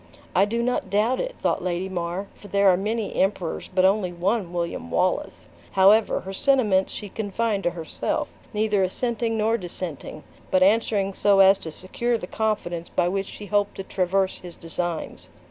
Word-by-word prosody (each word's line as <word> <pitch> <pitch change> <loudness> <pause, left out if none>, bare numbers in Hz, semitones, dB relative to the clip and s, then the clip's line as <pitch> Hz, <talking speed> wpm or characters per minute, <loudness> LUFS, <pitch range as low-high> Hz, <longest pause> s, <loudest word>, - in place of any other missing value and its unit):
"I 195 - +5
do 235 +3 -1
not 245 -5 -1
doubt 215 +6 +2
it," - - -3
thought - - +1
Lady 180 +1 -1
Mar; 180 +1 -3
"for 205 - -14
there 200 -1 +4
are 185 - +5
many 210 +3 -2
emperors, 190 -3 -1
but 185 0 +3
only 190 -1 +2
one 185 +2 -1
William 170 - -3
Wallace!" - - -1 0.3
However, 200 +3 +5
her 190 +1 -7
sentiments 210 -6 +2
she 205 - -6
confined 210 +1 -2
to - - +4
herself: 170 -2 -3 0.2
neither 210 -2 +1
assenting 225 +4 -1
nor 225 +2 +1
dissenting, 175 -4 -6 0.3
but 185 0 +4
answering 200 -1 +2
so 200 0 +3
as 195 0 +7
to 160 - -6
secure 235 +8 -2
the 200 - -6
confidence 180 -5 -2
by 175 - +1
which 195 +1 -2
she 210 - -9
hoped 205 0 0
to 195 - -5
traverse 190 0 0
his 175 -1 -10
designs. 170 0 -4
195 Hz, 175 wpm, -24 LUFS, 180-215 Hz, 0.3 s, as